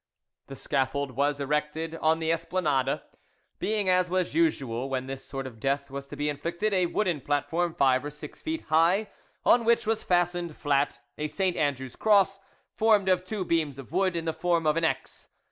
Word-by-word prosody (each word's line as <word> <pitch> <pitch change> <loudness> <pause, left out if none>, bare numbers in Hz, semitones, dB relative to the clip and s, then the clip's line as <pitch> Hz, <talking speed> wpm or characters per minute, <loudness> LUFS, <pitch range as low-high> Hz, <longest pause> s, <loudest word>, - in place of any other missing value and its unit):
The 135 - -8
scaffold 135 +1 -1
was 140 +3 0
erected 150 +3 -1
on 160 +1 +3
the 160 0 0
Esplanade: 165 -5 0 0.6
being, 210 -2 0
as 185 -1 +3
was 185 0 0
usual 135 - 0
when 130 -1 -2
this 135 0 -6
sort 135 -1 -5
of 120 -4 -9
death 140 +3 -1
was 140 0 -6
to - - -8
be 145 - -2
inflicted, 170 +8 -2
a 185 -2 +3
wooden 175 -5 0
platform 160 +4 -1
five 130 -1 +3
or 145 - -4
six 150 0 -10
feet 320 0 -3
high, 170 +7 +3 0.4
on 240 - +5
which 230 0 +3
was 220 0 0
fastened 175 -2 0
flat 145 -2 +1 0.2
a 150 - -1
St. 185 +2 0
Andrew's 135 -6 -1
cross, 195 -2 +3 0.3
formed 215 -3 +3
of 180 -1 +3
two 190 0 -4
beams 155 -5 0
of 135 -1 -10
wood 185 +1 +1
in 165 -1 -2
the 160 - 0
form 170 -1 0
of 155 0 +3
an 165 - 0
X. 160 - -2
160 Hz, 190 wpm, -27 LUFS, 140-185 Hz, 0.6 s, on